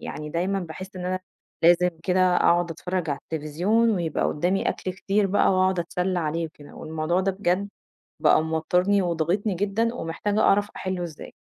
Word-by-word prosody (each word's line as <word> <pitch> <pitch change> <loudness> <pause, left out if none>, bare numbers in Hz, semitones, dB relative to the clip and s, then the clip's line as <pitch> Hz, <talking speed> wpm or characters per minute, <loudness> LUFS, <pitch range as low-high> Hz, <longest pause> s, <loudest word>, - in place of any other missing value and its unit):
يعني 150 0 -6
دايمًا 190 +4 -1
باحس 185 +3 -8
إن 180 0 -4
أنا 185 0 -1 0.4
لازم 175 +1 +5
كده 185 0 +3
أقعُد 175 0 +3
أتفرّج 175 0 -3
على 140 - -2
التليفزيون 175 +10 +1
ويبقى 170 -6 -1
قُدّامي 180 +6 0
أكل 185 - -3
كتير 195 +2 0
بقى 200 +2 +3
وأقعُد 185 -1 +2
أتسلّى 180 +2 -1
عليه 165 0 -1
وكده، 150 -2 -15
والموضوع 160 +3 -1
ده 195 +1 0
بجد 190 +1 0 0.5
بقى - - +5
موتّرني 180 +5 +1
وضاغطني 180 +4 0
جدًا 205 +5 0
ومحتاجة 205 +3 -2
أعرف 205 +1 +3
أحِلّه 185 -1 -3
إزاي. 160 -3 -8
180 Hz, 160 wpm, -25 LUFS, 165-195 Hz, 0.5 s, لازم